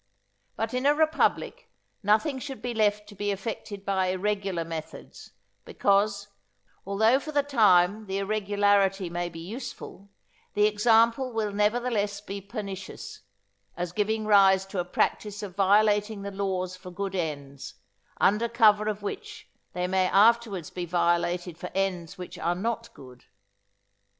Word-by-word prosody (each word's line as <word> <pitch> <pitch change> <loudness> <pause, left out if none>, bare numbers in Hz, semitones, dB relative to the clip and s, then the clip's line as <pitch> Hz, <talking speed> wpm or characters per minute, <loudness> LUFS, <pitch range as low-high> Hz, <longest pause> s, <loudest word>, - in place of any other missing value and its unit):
But 225 +1 -3
in 255 +2 +1
a 290 - +5
republic 315 +1 0 0.3
nothing 220 +7 +2
should 270 0 -7
be 245 -1 -4
left 210 -1 +1
to - - -11
be 205 +1 -3
effected 200 -1 -5
by 190 -1 +1
irregular 190 -2 -1
methods, 160 -1 -8 0.3
because, 200 0 +1 0.6
although 220 +6 +3
for 305 - -7
the 290 -1 +2
time 210 -6 +3
the 190 0 -2
irregularity 200 -2 +1
may 175 0 -2
be 165 -1 -10
useful, 200 0 -8 0.5
the 210 - +4
example 230 +4 +3
will 220 -2 -1
nevertheless 210 0 0
be 200 -1 -7
pernicious, 200 - -7 0.6
as 175 -1 -3
giving 215 +3 -1
rise 195 -2 +5
to 195 -1 -5
a 175 - -1
practice 205 +3 -1
of 190 -3 -7
violating 205 +1 +2
the 200 - -5
laws 190 -2 -2
for 185 0 -11
good 195 +2 -4
ends, 145 -6 -5 0.4
under 215 +4 +3
colour 215 -3 +4
of 210 -1 -3
which 205 - -7 0.2
they 180 0 -2
may 185 0 +1
afterwards 210 -4 +3
be 180 - -5
violated 175 0 0
for - - -6
ends 185 -4 -2
which 180 -1 -8
are 175 +1 0
not 230 +4 -3
good. 125 -2 -14
200 Hz, 145 wpm, -27 LUFS, 185-220 Hz, 0.6 s, a